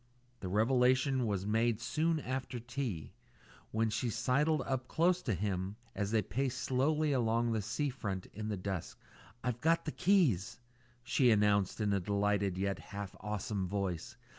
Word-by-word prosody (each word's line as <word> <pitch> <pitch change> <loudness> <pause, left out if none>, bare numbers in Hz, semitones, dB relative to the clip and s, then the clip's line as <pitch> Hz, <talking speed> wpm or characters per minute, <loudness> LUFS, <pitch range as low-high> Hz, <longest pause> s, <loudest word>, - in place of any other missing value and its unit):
The 95 - -5
revelation 125 +4 +3
was 100 -2 -1
made 110 +1 +2
soon 160 +6 0
after 130 -1 -3
tea, 120 - -4 0.6
when 110 0 0
she 120 +3 -1
sidled 140 +6 +1 0.2
close 175 +2 +2
up - - -19
to 115 -7 +1
him 95 +1 -2 0.2
as 100 -1 -2
they 110 -1 +2
paced 130 +6 -1
slowly 150 +4 +1
along 115 -2 +2
the 110 -1 0
sea 120 +7 -1
front 100 -7 -4
in 105 +1 -5
the 105 -2 -2
dusk. 95 -2 -4 0.4
"I've 125 -1 -2
got 165 +1 +3
the 155 - -2
keys," 125 - +2 0.4
she 125 +1 +3
announced 105 -3 +3
in 105 -2 +1
a 100 - +2
delighted, 100 0 +1
yet 100 0 -1
half 100 -2 -7
awesome 105 -2 -2
voice. 100 +4 -3
110 Hz, 160 wpm, -33 LUFS, 100-130 Hz, 0.6 s, revelation